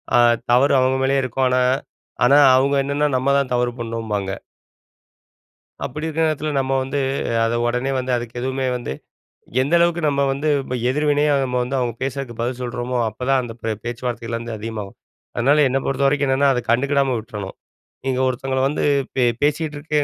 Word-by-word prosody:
ஆ - - +6 0.3
தவறு 130 +4 +4
அவங்க 130 +1 +2
மேலேயே 135 0 +2
இருக்கும், 130 +1 0
ஆனா 125 0 +2 0.6
ஆனா 140 +4 +6 0.2
அவுங்க 140 +2 +3
என்னன்னா 145 +2 0
நம்ம 130 +2 0
தான் 140 -2 0
தவறு 120 0 +1
பண்ணோம்பாங்க. 110 -4 -3 1.5
அப்படி 150 +5 -5
இருக்குற 160 +1 0
நேரத்துல 155 0 -2
நம்ம 135 0 -1
வந்து, 140 +2 -2 0.5
அத 115 - 0
உடனே 125 +3 -1
வந்து 130 0 -3
அதுக்கு 120 0 -7
எதுவுமே 130 +1 -1
வந்து, 120 - -5 0.7
எந்த 145 +6 -1
அளவுக்கு 170 0 +2
நம்ம 140 0 0
வந்து 145 +3 -3 0.2
ப - - -2 0.2
எதிர்வினையா 145 +1 +2
நம்ம 125 -1 -1
வந்து 125 +3 -3
அவுங்க 120 -2 -1
பேசுறதுக்கு 135 -3 -5
பதில் 125 +1 -2
சொல்றோமோ, 125 0 -3
அப்பதான் 130 +4 0
அந்த 120 -2 -7
பிரே 110 -1 -1
பேச்சுவார்த்தைகள் 120 -1 -3
வந்து 115 -1 -6
அதிகமாகும். 105 -2 -6 0.4
அதனால 145 +5 +4
என்ன 130 - +1
பொறுத்தவரைக்கும் 140 +1 +1
என்னன்னா, 140 +1 +3
அத 125 - -1
கண்டுக்கிடாம 135 +1 +2
விட்றணும். 105 -3 -7 0.5
நீங்க 130 -1 0
ஒருத்தவங்கள 130 +1 -1
வந்து 150 - -2 0.3
பே 130 - +2 0.2
பேசிட்டு 150 +1 0
இருக்கே 150 0 -1
130 Hz, 165 wpm, -21 LUFS, 120-140 Hz, 1.5 s, ஆ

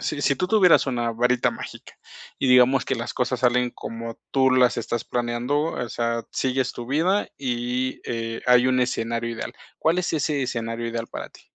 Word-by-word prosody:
si 145 - -2
si 140 - +2
tú 180 - 0
tuvieras 185 -8 +5
una 120 -3 -1
varita 125 +1 +2
mágica - - -9 0.4
y - - 0
digamos 125 +1 +5
que - - -1
las 120 0 -5
cosas 125 0 -1
salen 125 0 +2
como 115 -1 -7
tú 130 -1 +3
las 125 -1 +4
estás 120 0 -3
planeando, 120 +4 -1
o 125 - -4
sea, 115 0 -2
sigues 130 -1 0
tu 120 - -7
vida 170 +10 +1
y, 125 0 -2
eh, 115 -1 -4
hay 125 0 +6
un 130 0 +2
escenario 115 -1 -1
ideal, 115 +2 -6 0.2
¿cuál 160 +2 +2
es 180 -2 -1
ese 150 -2 0
escenario 115 -2 -3
ideal 115 0 -3
para - - -7
ti? - - -17
125 Hz, 185 wpm, -24 LUFS, 120-130 Hz, 0.4 s, hay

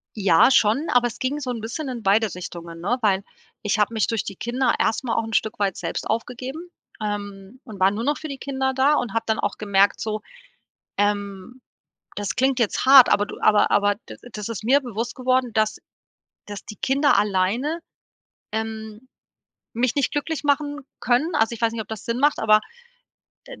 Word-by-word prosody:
Ja, 195 0 +5
schon, 255 +6 +3
aber 245 -1 +4
es 240 - -9
ging 275 +3 -1
so 260 -3 -5
'n 230 -3 -5
bisschen 265 +6 -4
in 245 -2 -5
beide 205 +1 +2
Richtungen, 170 -2 -8
ne, 230 +8 0
weil, 195 -3 +2 0.4
ich 210 +1 0
hab 210 - +3
mich 220 -2 0
durch 225 -2 -1
die 200 - -7
Kinder 245 +6 0
erst 225 - +1
mal 235 -3 -1
auch 230 - +1
'n 225 - -7
Stück 220 -1 0
weit 195 -3 0
selbst - - -4
aufgegeben, 255 +9 -4 0.3
ähm, 205 +1 -5
und 215 -6 -11
war 190 +1 +4
nur 215 +3 -3
noch 290 +3 0
für 315 - -7
die 275 -2 -6
Kinder 265 -1 -2
da 270 +3 +3
und 245 - -1
hab 225 0 -1
dann 220 - 0
auch 205 - -2
gemerkt, 200 -1 +2
so, 215 -1 -3 0.8
ähm, 205 +3 -2 0.6
das 205 -1 -3
klingt 265 0 +2
jetzt 230 +3 0
hart, 265 -2 +9
aber 205 0 +3
du - - -9
aber 210 -1 +4
aber 205 0 +3
das 215 -3 -8
ist 225 -2 -5
mir 275 +5 +4
bewusst 235 -2 -4
geworden, 255 -1 +1
dass 215 0 +1 0.7
dass 205 -1 -8
die 215 - -9
Kinder 275 +1 +2
alleine, 210 - 0 0.7
ähm, 220 +1 -5 0.7
mich 240 +1 0
nicht 285 -2 +1
glücklich 300 +1 -3
machen 290 0 0 0.2
können. 260 +8 +1
Also, 230 -5 +2
ich 230 - -9
weiß 230 - +2
nicht, 225 - -3
ob 200 - -10
das 220 -2 -7
Sinn 230 +1 -2
macht, 290 +2 +3
aber 215 -1 +5 0.9
d - - -11
225 Hz, 195 wpm, -23 LUFS, 205-260 Hz, 0.9 s, hart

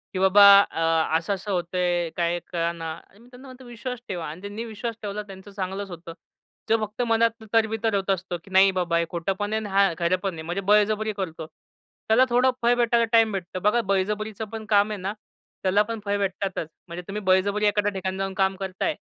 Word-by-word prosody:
की - - -1
बाबा 190 +2 +6 0.2
अ, 165 -3 0
अस 165 +3 -7
असं 200 +1 -3
होत 175 -1 -2
आहे, 175 -2 +1
काही 170 0 0
कळेना. 170 -1 -2 0.2
आणि 200 - -23
मी 235 - -19
त्यांना 255 +2 -14
म्हणतो 255 0 -13
विश्वास 245 +1 -6
ठेवा 175 -4 -4
आणि 155 +4 -8
त्यांनी 205 +3 -6
विश्वास 230 +1 -5
ठेवला 210 0 -4
त्यांचं 195 0 -12
चांगलंच 195 0 -4
होतं. 170 -1 -9 0.6
जो 225 - +4
फक्त 215 +3 -6
मनात 230 0 +1
तरबितर 225 -1 +1
होत 195 0 -2
असतं, 185 -2 -1
की 195 - -17
नाही 190 +1 +6
बाबा 170 -2 +1
हे 170 - +1
खोटं 170 +2 -2
पण 205 +1 -2
आहे 220 - +1
आणि 210 - -6
हा 195 -1 +3
खरं 170 +2 +2
पण 195 -2 -1
आहे 160 - -7
म्हणजे 175 +4 -3
बळजबरी 215 +1 +3
करतो. 165 -4 -4 0.6
त्याला 230 +4 +5
थोडं 250 +2 +3
फळ 240 +1 +4
भेटायला 235 -1 +2
टाईम 225 -2 +5
भेटतो. 185 -2 -5
बघा 210 +5 +2
बळजबरीचं 210 +2 -1
पण 220 -1 -6
काम 205 0 +4
आहे 210 - -4
ना, 195 +2 -3 0.5
त्याला 195 +2 +3
पण 225 +1 -5
फळ 200 0 0
भेटतातच. 195 -3 -2 0.2
म्हणजे 170 +1 -6
तुम्ही 210 +2 -4
बळजबरी 200 +3 +2
एखाद्या 205 0 +1
ठिकाणी 190 -1 -4
जाऊन 195 0 -3
काम 190 0 +2
करताय. 195 - -2
200 Hz, 210 wpm, -25 LUFS, 185-220 Hz, 0.6 s, बाबा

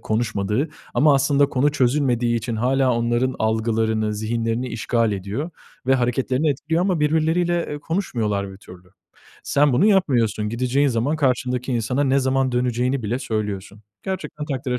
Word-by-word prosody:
konuşmadığı 110 +4 -1 0.3
ama 150 -1 +5
aslında 140 +1 +3
konu 140 +3 +1
çözülmediği 125 -3 +1
için 115 0 -3
hâlâ 130 +2 +2
onların 120 +2 0
algılarını, 110 -1 0
zihinlerini 115 +3 -2
işgal 115 -1 0
ediyor 100 - -4 0.4
ve 135 - +4
hareketlerini 130 +4 +1
etkiliyor 155 +5 -1
ama 185 -4 0
birbirleriyle, 160 +3 +1
eee, 150 - -4
konuşmuyorlar 110 - -2
bir 95 - -11
türlü. 90 -2 -15 0.6
Sen 145 0 +3
bunu 170 +12 +4
yapmıyorsun. 120 - +2
Gideceğin 125 +5 +1
zaman 125 +5 0
karşındaki 125 -2 0
insana 125 +4 0
ne 135 +1 +3
zaman 130 -1 +1
döneceğini 125 +1 0
bile 115 +4 -1
söylüyorsun. 105 -3 -4 0.2
Gerçekten 190 -5 -5
takdire 130 -3 -2
125 Hz, 140 wpm, -22 LUFS, 115-140 Hz, 0.6 s, ama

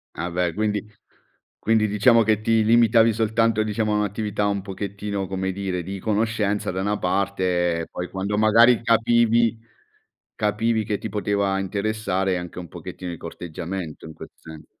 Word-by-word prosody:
Ah 85 +1 -3
beh, 85 -1 -1
quindi 105 0 -1 0.7
quindi 110 -1 +2
diciamo 115 +3 +4
che 110 0 +1
ti 110 0 +2
limitavi 115 0 +5
soltanto, 110 0 +1
diciamo, 110 0 -1
a - - +1
un'attività 105 0 -1
un 100 -1 -1
pochettino, 100 0 -4
come 95 0 -2
dire, 95 -2 -3
di 95 +3 -6
conoscenza 105 -1 0
da 95 +1 -3
una 105 +1 -1
parte, 90 -2 0
e - - -6
poi 90 0 -6
quando 100 +2 -3
magari 115 +2 +5
capivi 115 0 +3 0.8
capivi 110 +1 0
che 105 -2 -1
ti - - -5
poteva 100 -1 0
interessare, 95 -1 -1
anche 90 0 -7
un 85 - -8
pochettino 90 +3 -8
di 85 - -7
corteggiamento 85 0 -7
in 80 - -9
questo - - -12
senso. 80 -1 -12
105 Hz, 160 wpm, -23 LUFS, 95-110 Hz, 0.8 s, limitavi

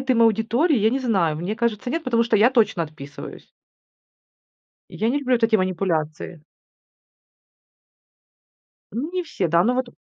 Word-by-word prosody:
добавляет 265 0 -3
им 230 -2 +4
аудитории? 230 - +2
Я 215 +1 +3
не 265 +3 -1
знаю. 190 -11 +1
Мне 185 +7 -4
кажется, 235 0 -2
нет, 325 +3 -3
потому 235 -2 +2
что 230 -2 +2
я 225 +5 +5
точно 220 -9 +2
отписываюсь. 150 -1 -11 1.4
Я 220 - -2
не 285 - 0
люблю 255 -3 +1
вот 230 -1 +1
эти 225 - +1
манипуляции. 170 -4 -2 2.5
Не 330 +10 -3
все, 190 - -3
да, 170 +2 +3
но 245 +3 +2
вот. 255 -1 -1
225 Hz, 150 wpm, -22 LUFS, 180-250 Hz, 2.5 s, я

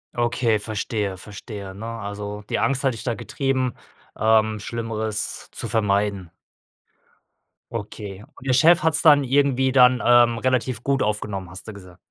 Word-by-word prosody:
Okay, 120 -1 +1
verstehe 105 -2 -3
verstehe, 100 0 -9
ne? 110 +3 -8
Also 105 -2 -6
die - - 0
Angst 135 0 0
hat 135 -2 +2
dich 110 - -7
da 120 - -1
getrieben, 130 +3 -2 0.4
ähm, 110 0 +2
Schlimmeres 110 -1 -4
zu - - -5
vermeiden. 100 -4 0 1.4
Okay. 105 -3 -7
Und 135 - -12
der 130 - +3
Chef 160 +6 +5
hat's 160 0 +2
dann 145 -3 +7
irgendwie 130 0 +2
dann, 125 -2 +5
ähm, 120 -1 +5
relativ 130 -2 0
gut 140 -1 +1
aufgenommen, 105 -3 -3
hast 95 +3 -9
du 110 - -7
gesagt. 90 -3 -13
115 Hz, 150 wpm, -23 LUFS, 105-130 Hz, 1.4 s, dann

